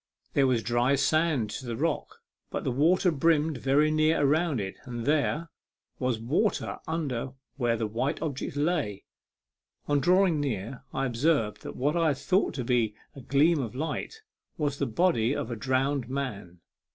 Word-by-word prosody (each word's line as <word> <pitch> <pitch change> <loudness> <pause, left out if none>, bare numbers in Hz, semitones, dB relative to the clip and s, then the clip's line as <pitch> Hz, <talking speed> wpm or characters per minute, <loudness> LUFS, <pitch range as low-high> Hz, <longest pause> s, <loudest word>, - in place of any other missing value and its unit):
There 140 -2 +4
was 120 -3 +1
dry 120 +3 +2
sand 145 -5 +1
to 125 +3 -6
the 115 - -3
rock; 165 - -2 0.3
but - - -4
the 135 - 0
water 170 +8 +3
brimmed 155 -1 +2
very 145 +4 +3
nearly 155 +1 +3
around 155 -1 +2
it, 95 -1 -3
and 120 -2 -5
there 155 +2 +1 0.5
was 125 -3 0
water 150 - 0
under 135 -6 -2 0.2
where 120 -3 +1
the 110 - -1
white 120 +7 -2
object 145 -2 -4
lay. 145 - -1 0.8
On 145 -1 +2
drawing 180 +1 +3
near, 125 -3 -3
I 135 +1 -1
observed 125 -2 +1
that - - -7
what 145 +5 0
I 165 -1 +3
had 145 -3 +1
thought 185 +7 +1
to 130 - -2
be 115 -3 +1 0.2
a 135 - -9
gleam 145 +5 +3
of 120 -3 -4
light 160 - -4 0.3
was 145 -3 -1
the 140 - 0
body 130 -2 +2
of 130 -4 -3
a - - -2
drowned 130 +2 0
man. 105 -11 -5
140 Hz, 170 wpm, -28 LUFS, 120-155 Hz, 0.8 s, There